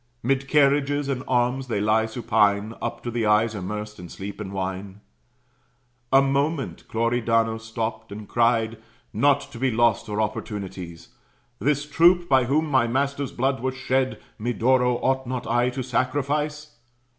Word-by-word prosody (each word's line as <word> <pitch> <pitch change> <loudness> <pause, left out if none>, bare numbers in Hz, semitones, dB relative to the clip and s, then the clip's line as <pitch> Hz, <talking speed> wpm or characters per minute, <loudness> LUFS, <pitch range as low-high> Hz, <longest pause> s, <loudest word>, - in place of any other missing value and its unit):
'Mid 135 +2 0
carriages 145 0 +2
and 130 -2 -2
arms 125 +1 +1
they 115 -4 -1
lie 110 +2 +2
supine, 110 -2 +1
Up - - -4
to 120 - -3
the 115 -2 0
eyes 105 +1 +3
immersed 105 +1 -5
in 90 -1 -9
sleep 100 +3 -7
and 95 -2 -6
wine. 95 +1 -4 1.1
A 135 +1 +6
moment 140 +2 -1
Cloridano 115 -1 +1
stopt, 110 -1 -5
and 105 0 -8
cried, 115 -1 +1 0.3
"Not 140 +6 +3
to 120 - -9
be 130 +1 +2
lost 115 -1 +2
are 105 0 -2
opportunities. 95 -6 -5 0.5
This 145 +1 +1
troop, 175 +3 +4
by 130 -4 +4
whom 150 +5 +1
my 130 -6 +2
master's 140 +3 -1
blood 135 +2 0
was 130 +2 -2
shed, 130 0 0 0.2
Medoro, 125 +2 +2
ought 130 -1 +1
not 125 -1 -3
I 120 +2 +2
to 130 +1 -4
sacrifice? 145 +3 -2
120 Hz, 150 wpm, -24 LUFS, 110-135 Hz, 1.1 s, A